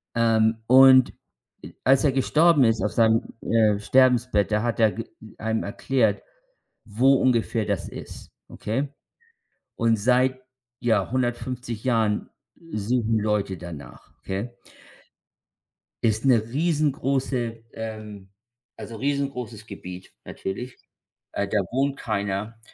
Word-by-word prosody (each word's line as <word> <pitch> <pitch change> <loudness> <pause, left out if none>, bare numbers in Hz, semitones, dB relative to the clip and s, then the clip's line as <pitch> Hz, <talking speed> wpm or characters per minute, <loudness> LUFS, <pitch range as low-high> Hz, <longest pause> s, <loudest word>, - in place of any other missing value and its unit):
Ähm, 110 -1 +3
und 130 0 +7 0.7
a - - -1
als 135 +2 +4
er 140 - +4
gestorben 150 +2 +4
ist 115 -1 +2
auf 105 - 0
seinem, 115 -1 +3 0.2
äh, 110 -3 +2
Sterbebett, 125 -3 +3
da 105 - +2
hat 120 -1 -2
er 110 -1 +4
g 115 - -6 0.3
einem 110 0 -2
erklärt, 110 0 0 0.6
wo 125 +6 +3
ungefähr 115 -4 +1
das 100 -3 -2
ist, - - -10 0.2
okay? 130 +7 -3 0.9
Und 115 -1 +2
seit, 130 +3 +2 0.4
ja, 110 -5 +1
150 120 -2 -3
Jahren 110 -4 0 0.4
suchen 110 +1 0
Leute 105 -3 -1
danach, 85 -5 -11
okay? 100 +5 -4 1.5
Ist 110 +2 +1
'ne 125 -4 +5
riesengroße 135 -6 -1
ähm, 110 -3 -8 0.5
also 115 - -8
riesengroßes 130 -5 -3
Gebiet 90 -3 -10
natürlich, 125 +7 -6 0.6
äh, 100 - -1
da 105 +1 +1
wohnt 135 +2 0
keiner 105 +1 -3
115 Hz, 115 wpm, -24 LUFS, 105-130 Hz, 1.5 s, und